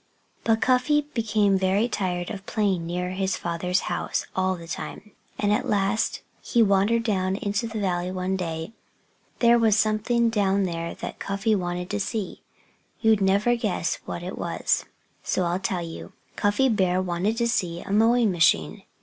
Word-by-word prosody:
But 225 -1 +2
Cuffy 260 +4 +3
became 210 -4 +2
very 195 +4 +2
tired 180 -6 -2
of 195 -2 -8
playing 190 -6 0
near 180 +1 -2
his 190 0 -1
father's 180 +2 -1
house - - -2
all 185 0 +1
the 170 -2 -10
time. 165 +6 -7 0.3
And 205 0 +1
at - - -1
last 205 +2 0 0.2
he 235 -2 +3
wandered 205 +3 +3
down 190 -4 0
into 205 +3 -2
the 220 -1 -5
valley 180 -2 -1
one 185 +1 -2
day. 165 0 -4 0.7
There 235 0 +6
was 220 -2 +4
something 225 +2 +2
down 200 -2 +2
there 170 -2 -3
that - - -7
Cuffy 200 +3 0
wanted 180 -2 -2
to 205 - -1
see. 205 0 -3 0.6
You'd 220 -3 +4
never 200 +5 +3
guess 235 - -1
what - - -5
it - - -6
was; - - 0 0.4
so 185 - 0
I'll 175 +1 0
tell 190 -2 -2
you. 165 -1 -8 0.2
Cuffy 205 +6 +2
Bear 185 -6 +2
wanted 185 +4 -1
to 235 0 +1
see 180 -7 -1
a - - -8
mowing 225 +1 +4
machine. 155 - +2
195 Hz, 165 wpm, -25 LUFS, 180-220 Hz, 0.7 s, There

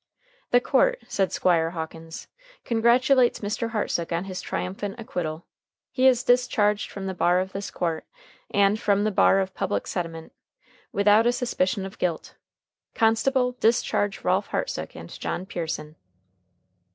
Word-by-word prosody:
"The 245 - +5
court," - - +2
said 190 -2 0
Squire 165 -3 +2
Hawkins, 165 -1 -7 0.4
"congratulates 240 +2 +3
Mr. 215 +2 -2
Hartsook 205 -6 -2
on 170 +1 -1
his 185 -1 -6
triumphant 195 +4 -4
acquittal. 175 -9 -4 0.5
He 260 0 +3
is 250 -2 +4
discharged 215 -4 +2
from 195 -1 -7
the 190 - -3
bar 180 0 +2
of 190 +1 -3
this 195 +1 -5
court, 165 -2 -3 0.4
and 200 +1 +3
from 205 -2 +2
the 215 - +1
bar 195 0 +4
of 190 -1 -2
public 205 - -2
sentiment, 165 -3 -5 0.6
without 210 +3 +4
a - - +5
suspicion 205 -5 -1
of 195 - -10
guilt. 170 -3 -2 0.6
Constable, 250 +3 +2
discharge 220 -3 +1
Ralph - - +1
Hartsook - - -3
and - - -9
John 180 - -3
Pearson." 160 -4 -5
200 Hz, 140 wpm, -25 LUFS, 180-230 Hz, 0.6 s, The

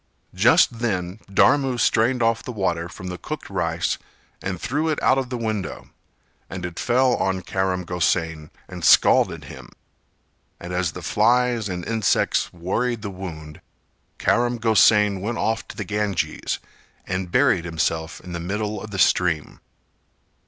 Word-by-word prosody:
Just 115 - +4
then 95 -4 -2
Dharmu 130 +4 +3
strained 120 +2 +2
off 115 0 +2
the 125 - -6
water 85 -6 -2
from 95 0 -8
the 90 -1 -6
cooked - - -7
rice - - -1 0.4
and 95 -2 -4
threw 150 - -1
it 155 - 0
out 130 - +4
of 130 -2 -4
the 125 - -3
window, 110 -4 -4 0.6
and 95 -1 -5
it 90 -1 -6
fell 125 +1 +3
on 95 -1 -1
Karam 95 -1 -1
Gosain 80 -3 -1 0.2
and 90 -2 -9
scalded - - +5
him, - - -11 0.9
and 90 +1 -7
as 90 -3 -1
the - - -8
flies 120 -3 +2
and 90 -2 -4
insects 110 -3 +1
worried 110 +7 -2
the 100 - -4
wound, 80 -5 -8 0.6
Karam 120 0 +1
Gosain 105 -3 +4
went 115 +4 -3
off 110 0 -1
to - - -11
the - - -4
Ganges 105 -3 -2 0.5
and 90 -1 -3
buried 125 -9 +3
himself 80 -1 -2
in 90 - -10
the 85 - -3
middle 105 +5 -3
of 110 - -8
the 100 - -6
stream. 90 -5 +1
100 Hz, 150 wpm, -23 LUFS, 90-115 Hz, 0.9 s, scalded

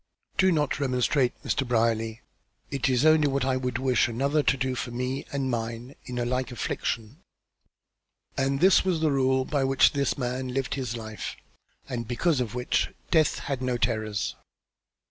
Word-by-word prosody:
Do 190 0 +5
not 150 -4 0
remonstrate, 130 -1 +1
Mr. 135 - 0
Brierly. 115 -1 +1 0.5
It 135 -2 0
is 130 +2 +2
only 155 -1 +5
what 135 -2 0
I 130 -1 +1
would 125 -2 -2
wish 130 -1 +2
another 140 +6 +1
to 135 - +2
do 130 0 -1
for 125 0 -4
me 125 +3 -3
and 140 -1 -1
mine 120 +1 -3
in 125 -1 -6
a 120 - 0
like 125 +1 -1
affliction." 120 +3 -3 1.1
And 135 0 0
this 190 +1 +6
was 185 -4 +1
the 155 -1 +2
rule 130 -1 +2
by 145 -1 0
which 135 0 +4
this 140 -1 0
man 130 0 -2
lived 130 +1 -2
his 125 -4 -3
life, 110 -1 -6 0.5
and 120 -4 -4
because 140 +5 +1
of 120 -1 -3
which 125 0 0 0.2
death 160 -3 +3
had 135 -2 -2
no 125 -1 0
terrors. 110 -3 -1
130 Hz, 170 wpm, -27 LUFS, 120-140 Hz, 1.1 s, this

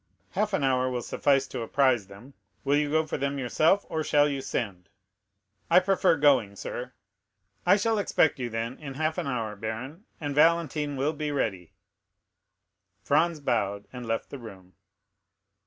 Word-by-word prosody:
"Half 210 -1 -1
an 195 - +1
hour 130 -1 +2
will 125 -1 -3
suffice 135 -2 +2
to - - -5
apprise 120 -3 +2
them; 105 +8 -14 0.3
will 140 +1 +2
you 145 0 +1
go 160 +1 +2
for 150 - -4
them 140 +1 -1
yourself, 155 - +2
or 160 -1 -2
shall 145 -1 +4
you 140 -2 -2
send?" 100 -8 -4 0.8
"I 175 +2 +7
prefer 185 -2 +2
going, 130 -9 +3
sir." 125 +5 -6 0.7
"I 195 - +7
shall 225 +1 +1
expect 160 -7 +2
you, 120 -2 -2
then, 115 +2 -4
in 140 -3 -7
half 155 +4 -1
an 170 - -3
hour, 115 -5 -2
baron, 120 - -6
and 145 -2 -3
Valentine 150 -2 +2
will 145 +4 0
be 150 0 -3
ready." 95 - -2 1.3
Franz 160 +2 +2
bowed 100 -7 -1
and 125 -2 -7
left 115 0 -2
the 140 - -7
room. 95 -6 -12
140 Hz, 165 wpm, -27 LUFS, 115-155 Hz, 1.3 s, I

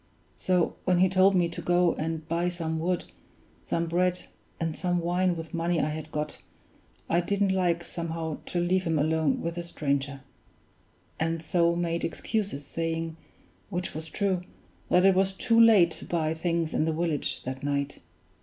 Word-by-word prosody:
So 180 -2 +1
when 185 -1 +3
he 185 +1 +5
told 190 +1 +4
me 175 -2 +3
to 170 - -6
go 175 -1 +3
and 160 0 -4
buy 170 +2 0
some 165 -2 -3
wood, 180 +2 -1 0.6
some 170 - 0
bread, 180 +2 0 0.3
and 165 -2 -1
some 180 -1 0
wine 175 +1 +1
with 160 +1 -7
money 170 0 0
I 150 - +1
had 155 0 -6
got, 150 0 -3 0.7
I 170 +1 +2
didn't 200 +2 +1
like, 175 -2 +1
somehow, 165 -2 -4
to 175 - -1
leave 180 +2 +2
him 165 -2 +1
alone 155 +1 +1
with 170 - -2
the 175 0 -4
stranger; 140 -4 -2 1.0
and 165 0 -1
so 170 +1 +2
made 170 -1 -1
excuses, 195 -5 -2
saying 165 0 -3 0.5
(which 180 -1 -3
was 160 +1 -6
true) 190 0 0 0.5
that 180 +1 +5
it 195 - +7
was 190 +1 +2
too 230 +4 +3
late 205 -7 +7
to - - -8
buy 160 -2 0
things 165 0 -1
in 155 - +2
the 160 - 0
village 160 -3 -1
that 130 +1 -5
night. 140 0 -2
170 Hz, 175 wpm, -28 LUFS, 160-180 Hz, 1.0 s, it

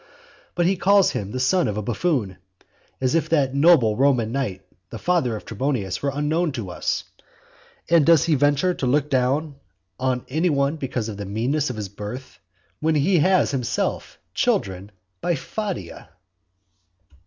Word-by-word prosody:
But 175 - +1
he 190 +2 +2
calls 200 +1 +4
him 100 - -4
the 130 - -4
son 170 +8 +2
of 105 - -3
a 105 - -2
buffoon. 120 - -1 0.6
As 130 +1 0
if 165 - +1
that 140 -5 +2
noble 140 -7 +5
Roman 125 -3 +2
knight 115 -8 -3 0.3
the - - -7
father 165 -10 0
of 105 - -8
Trebonius 110 -5 -2
were 140 - 0
unknown 155 +4 0
to 110 -8 -5
us. - - -2 0.8
And 170 -2 +5
does 165 0 +5
he 165 - +2
venture 145 +5 +2
to 135 - -3
look 145 +3 +1
down 135 +3 0 0.4
on 130 -1 -1
any 160 +6 0
one 140 +1 +1
because 125 -6 -3
of 105 -3 -6
the 100 - -5
meanness 130 +9 -1
of 125 - -4
his 105 -2 -4
birth, 105 +6 -8 0.4
when 160 0 +1
he 165 +5 +3
has 185 +2 +3
himself 130 -4 -2 0.2
children 95 0 -1 0.3
by 175 - 0
Fadia? 185 - -6
135 Hz, 165 wpm, -23 LUFS, 115-160 Hz, 0.8 s, noble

